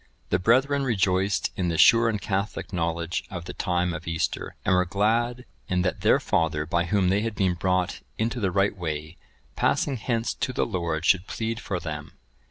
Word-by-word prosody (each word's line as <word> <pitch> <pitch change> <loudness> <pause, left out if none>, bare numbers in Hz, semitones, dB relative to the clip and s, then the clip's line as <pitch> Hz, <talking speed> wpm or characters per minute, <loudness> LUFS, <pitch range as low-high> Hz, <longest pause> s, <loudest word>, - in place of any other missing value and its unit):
The 90 - +3
brethren 130 +8 +3
rejoiced 100 -5 +1
in 90 - -1
the 85 -1 -1
sure 115 +4 +6
and 105 -2 -1
catholic 100 +2 -3
knowledge 85 0 -1
of 85 -3 -6
the - - -6
time 90 -1 0
of 85 0 -7
Easter, 85 -1 -2
and - - +3
were 90 0 +4
glad 115 +6 0 0.2
in 90 -1 +1
that 90 - -1
their - - +4
father, 80 -2 0
by 85 +2 0
whom 95 0 +2
they 100 +2 +2
had 115 -1 -3
been 95 -3 +2
brought 90 0 0 0.2
into 115 +2 -1
the 100 -4 +1
right 100 +2 +1
way, 80 -2 -5 0.4
passing 140 -3 +1
hence 115 0 -1
to 130 - -3
the - - +1
Lord 85 -5 -2
should 95 +1 +3
plead 115 0 -3
for 95 -6 -3
them. 75 -3 -6
95 Hz, 190 wpm, -26 LUFS, 85-110 Hz, 0.4 s, sure